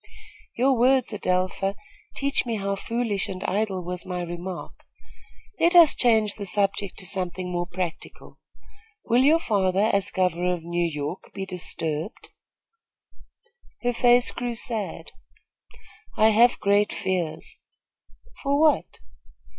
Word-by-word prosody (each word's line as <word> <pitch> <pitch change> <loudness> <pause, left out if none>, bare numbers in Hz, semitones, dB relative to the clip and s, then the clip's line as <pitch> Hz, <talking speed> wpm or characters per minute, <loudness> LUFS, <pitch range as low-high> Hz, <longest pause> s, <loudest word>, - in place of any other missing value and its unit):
"Your 260 +2 +3
words, 255 +1 +3
Adelpha, 185 0 -1 0.4
teach 280 0 0
me 235 -2 -3
how 200 -1 -2
foolish 230 -1 -2
and 185 0 -6
idle 200 -2 -1
was 180 0 -5
my 180 -2 -4
remark. 175 +1 -6 0.9
Let 345 +2 +3
us 335 -4 +8
change 220 -4 +2
the 205 - -7
subject 200 -1 +1
to 185 - -4
something 180 -1 -2
more 175 0 -2
practical. 180 -2 -6 0.7
Will 240 +2 +3
your 300 +5 +5
father, 200 - +1
as 200 -1 +2
governor 180 -1 0
of 170 - -10
New 170 0 -1
York, 150 +4 -6
be 195 -1 -4
disturbed?" 165 -1 -4 1.5
Her 245 0 +1
face 245 0 +4
grew 245 -1 -4
sad. 225 -3 -3 1.1
"I 220 +1 +5
have 235 +3 +4
great 205 +1 +2
fears." 185 -5 -3 0.8
"For 280 0 +1
what?" 310 -1 +2
200 Hz, 125 wpm, -25 LUFS, 180-235 Hz, 1.5 s, us